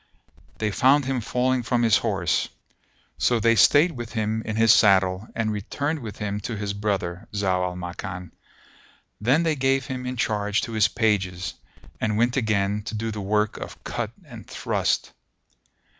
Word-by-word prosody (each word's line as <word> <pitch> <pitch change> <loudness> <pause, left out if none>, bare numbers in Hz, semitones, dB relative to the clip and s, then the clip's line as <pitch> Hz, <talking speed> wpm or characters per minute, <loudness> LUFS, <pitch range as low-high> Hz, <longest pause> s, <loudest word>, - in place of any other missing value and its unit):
They 110 -1 -1
found 135 +6 +4
him 130 -2 -1
falling 125 +3 0
from 120 0 0
his 115 -3 +5
horse; - - 0 0.7
so 120 -2 +2
they 115 +1 +4
stayed 145 +8 +5 0.2
him 110 -1 -1
in 110 -1 -4
his 115 0 +6
saddle 95 0 +3
and 110 -1 0
returned 145 +9 -2
with 110 -6 -8
him 105 -1 -3
to 110 +2 -5
his 100 -1 -3
brother, 100 -2 -2
Zau 95 -3 +1
al 90 0 -2
Makan; 90 0 -6 0.9
then 135 +9 +3
they 160 -2 +1
gave 135 -1 +1
him 125 -1 -5
in 125 0 -4
charge 105 -2 0
to 115 - -5
his 110 -2 +3
pages, 95 -6 0 0.5
and 105 -1 0
went 120 +2 +2
again 105 -4 0
to 110 - -4
do 110 +1 -2
the 105 -1 -5
work 105 +2 0
of - - -9
cut - - -3 0.2
and - - -11
thrust. - - -1
110 Hz, 165 wpm, -24 LUFS, 100-120 Hz, 0.9 s, his